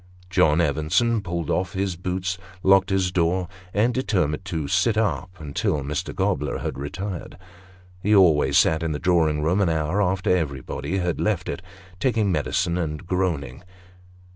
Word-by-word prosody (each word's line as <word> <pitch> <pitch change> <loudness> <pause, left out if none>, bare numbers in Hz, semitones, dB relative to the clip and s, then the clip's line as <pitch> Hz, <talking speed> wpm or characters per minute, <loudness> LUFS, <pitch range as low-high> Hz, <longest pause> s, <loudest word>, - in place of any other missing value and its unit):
John 80 -3 +4
Evenson 80 - +1
pulled 85 -4 -3
off 90 +1 -1
his 95 -2 -1
boots, 90 +1 -3 0.2
locked 95 0 +5
his 95 -2 +1
door, 90 +1 +1 0.2
and 110 +5 +2
determined 95 - 0
to 80 -6 -3
sit 90 +7 +2
up 105 -4 0
until 75 -1 -1
Mr. 70 +2 -3
Gobler 75 +1 0
had - - -4
retired. 90 +6 -5 0.6
He 105 +3 +3
always 85 -7 +5
sat 80 0 +4
in 80 -2 -1
the - - -2
drawing 80 -3 +2
room 90 +6 +2
an 95 - +2
hour 80 +5 0
after 90 -1 +2
everybody 75 +1 -3
else 90 - -1
had 90 - -1
left 100 -4 0
it, 70 - -4 0.4
taking 115 -6 +1
medicine, 85 +3 0
and 75 +1 -3
groaning. 85 -7 -2
90 Hz, 160 wpm, -24 LUFS, 75-95 Hz, 0.6 s, locked